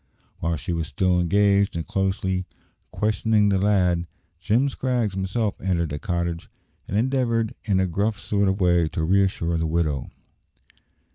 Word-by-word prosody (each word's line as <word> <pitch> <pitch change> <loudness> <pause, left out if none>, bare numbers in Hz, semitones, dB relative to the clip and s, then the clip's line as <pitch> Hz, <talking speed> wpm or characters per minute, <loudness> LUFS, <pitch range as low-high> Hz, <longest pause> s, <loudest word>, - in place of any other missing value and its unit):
While 85 0 -1
she 80 +4 -4
was 80 -2 -2
still 90 +5 +1
engaged 100 +3 +3
in 85 - -2
closely 95 -1 -1 0.4
questioning 105 0 +1
the 95 -1 +2
lad, 90 -4 +2 0.3
Jim 115 +9 +2
Scraggs 125 -6 -1
himself 95 +3 -2
entered 85 -4 0
the 75 0 -4
cottage, 85 -3 -3 0.4
and 100 - -2
endeavoured 115 -2 +1
in 100 -4 +2
a 95 - +2
gruff 100 +4 -1
sort 100 0 0
of 95 +2 0
way 85 -3 +3
to 80 - -3
reassure 85 -2 +1
the 80 - 0
widow. 75 -5 -1
95 Hz, 150 wpm, -24 LUFS, 85-105 Hz, 0.4 s, engaged